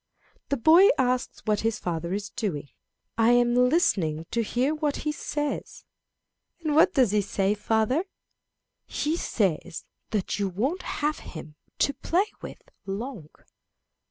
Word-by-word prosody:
The 280 - +1
boy 330 - +7
asks 250 -1 0
what 210 -2 +1
his 225 -1 0
father 170 -1 -3
is 205 +2 -3
doing. 180 - -3 0.5
"I 230 +2 +5
am 240 0 +4
listening 225 - +2
to 235 - +1
hear 250 +6 0
what 300 -2 -1
he 300 - +1
says." 295 -1 -4 0.8
"And 305 -2 0
what 335 +4 +5
does 255 -8 +4
he 210 0 +3
say, 195 0 0
father?" 220 - +1 0.8
"He 305 +2 -1
says 195 - -1 0.2
that 210 -2 -2
you 200 -1 0
won't 260 - -1
have 300 +1 -2
him 155 -2 -9 0.2
to 280 - +2
play 345 +8 +1 0.2
with - - -9 0.2
long." 200 - -5
235 Hz, 140 wpm, -26 LUFS, 200-290 Hz, 0.8 s, boy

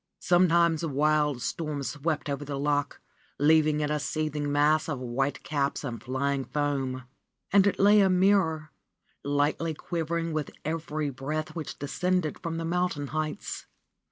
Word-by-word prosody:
Sometimes 170 -2 +3
wild 150 -3 +1
storms 150 -4 -3
swept 150 +1 -2
over 140 0 -3
the 145 -1 -4
loch, 145 0 0 0.4
leaving 155 0 +4
it 150 0 -1
a 150 - 0
seething 150 -1 -2
mass 150 +2 +3
of 145 - -2
white 130 +3 -2
caps 140 -1 -1
and 120 -5 -5
flying 135 +1 -1
foam. 135 -3 -2 0.5
And 200 0 +6
it 200 - +1
lay 205 +2 +6
a 195 - +4
mirror, 180 -5 +2 0.5
lightly 145 +3 0
quivering 165 +1 -2
with 155 -2 -2 0.2
every 155 -2 -2
breath 155 +4 -4
which 160 -4 -5
descended 180 +3 -1
from 165 -2 -4
the 165 - -3
mountain 175 -4 -1
heights. 155 -1 -4
150 Hz, 145 wpm, -28 LUFS, 145-165 Hz, 0.5 s, And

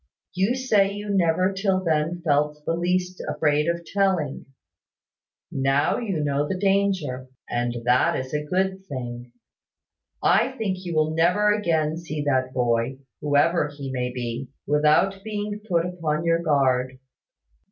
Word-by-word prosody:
You 195 +7 +1
say 215 -7 +2
you 205 0 -5
never 185 0 +2
till 190 -1 0
then 165 +1 0
felt 150 0 +1
the - - 0
least 180 +2 -1
afraid 150 0 +1
of 170 0 -1
telling. 185 -6 0 1.0
Now 135 +2 +1
you 195 -10 -2
know 145 0 0
the 185 - -2
danger; 190 -10 0 0.2
and 120 0 -1
that 125 +1 +3
is 130 +2 -6
a 150 0 -1
good 190 +4 -1
thing. 120 -4 -6 0.9
I - - +3
think 195 -4 -1
you 170 -2 -3
will 155 0 +2
never 180 +6 +3
again 160 -6 0
see 155 -3 -4
that 130 -3 +1
boy 120 0 0 0.2
(whoever 150 +2 +2
he 145 -2 -7
may 125 -1 -2
be), 125 +1 -4 0.2
without 155 +7 +3
being 210 -1 -4
put 170 -1 +2
upon 165 -3 -2
your 165 0 +2
guard. 130 -5 +1
160 Hz, 140 wpm, -24 LUFS, 140-190 Hz, 1.0 s, that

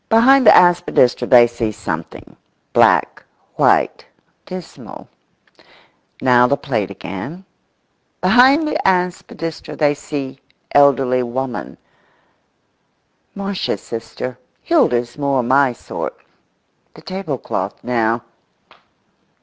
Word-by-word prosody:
Behind 250 +3 +5
the - - +9
aspidistra 175 -8 +3
they 120 -2 +7
see 120 -2 -3
something: 80 -5 -7 0.4
black, - - +3 0.3
white, - - +2 0.4
dismal; 185 -3 -10 1.2
now 125 -1 +5
the 140 - +1
plate 110 -10 -3
again; 100 - -8 0.7
behind 260 - +4
the - - -1
aspidistra 180 -3 -2
they 145 -2 +2
see 140 -2 -6 0.3
elderly 135 -3 +3
woman; 125 +1 -5 1.6
"Marsh's 200 -1 -3
sister, 120 +2 -7 0.2
Hilda's 125 - +1
more 140 -3 0
my 130 +2 +3
sort;" 120 - -7 0.8
the - - -15
tablecloth 185 -8 -5
now. 115 -1 0
135 Hz, 90 wpm, -18 LUFS, 120-180 Hz, 1.6 s, the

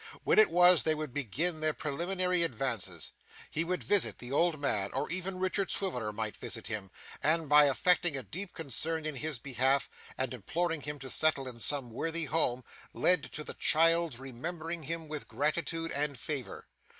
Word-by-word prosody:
When - - +4
it 435 - +7
was, 180 -1 +6
they 155 -1 +1
would 155 -4 -4
begin 150 - 0
their 155 -1 0
preliminary 180 +4 0
advances. 120 - -2 0.4
He 160 - 0
would 180 +2 -2
visit 205 -2 +3
the 120 +1 -8
old 160 +2 +2
man, 105 -9 0
or - - -2
even 185 +1 -1
Richard 185 +1 -1
Swiveller 125 - 0
might 110 0 -4
visit 115 - -3
him, 105 -3 -4 0.3
and 160 +1 +2
by 150 +1 +7
affecting 170 +2 +2
a 130 - -4
deep 180 - -4
concern 160 +2 -2
in 155 -3 -4
his 150 0 -3
behalf, 135 +2 0 0.3
and 130 -1 -2
imploring 165 - -2
him 145 +1 -5
to 135 -2 -6
settle 145 -4 +2
in 120 -2 -8
some 135 -1 +2
worthy 165 +7 -2
home, 130 -5 0 0.3
lead 180 -4 +3
to 150 - -5
the - - -7
child's 165 -3 +3
remembering 160 +6 -5
him 165 +1 -5
with 150 -1 -5
gratitude 160 +6 -2
and 145 -1 +1
favour. 140 -1 -6
155 Hz, 175 wpm, -31 LUFS, 130-170 Hz, 0.4 s, it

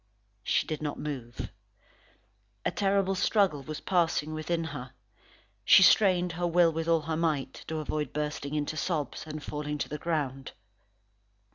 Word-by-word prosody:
She - - +1
did 155 - -4
not 150 -1 -3
move. 130 -6 -5 1.1
A - - +2
terrible 195 -1 +1
struggle 190 -5 +2
was 155 +2 -6
passing 165 -4 +1
within 165 +2 -1
her. 145 -5 -7 0.7
She 190 - +8
strained 180 -3 +5
her 175 +1 -1
will 170 -1 +4
with 165 +1 -3
all 165 -1 +3
her 160 +1 -2
might, 155 -5 0
to 160 - -3
avoid 150 -2 -2
bursting 150 -1 -3
into 150 +1 -1
sobs, 160 -2 -2
and 155 -1 -6
falling 150 0 -4
to - - -3
the 150 - -5
ground. 140 -5 -2
155 Hz, 150 wpm, -29 LUFS, 150-170 Hz, 1.1 s, She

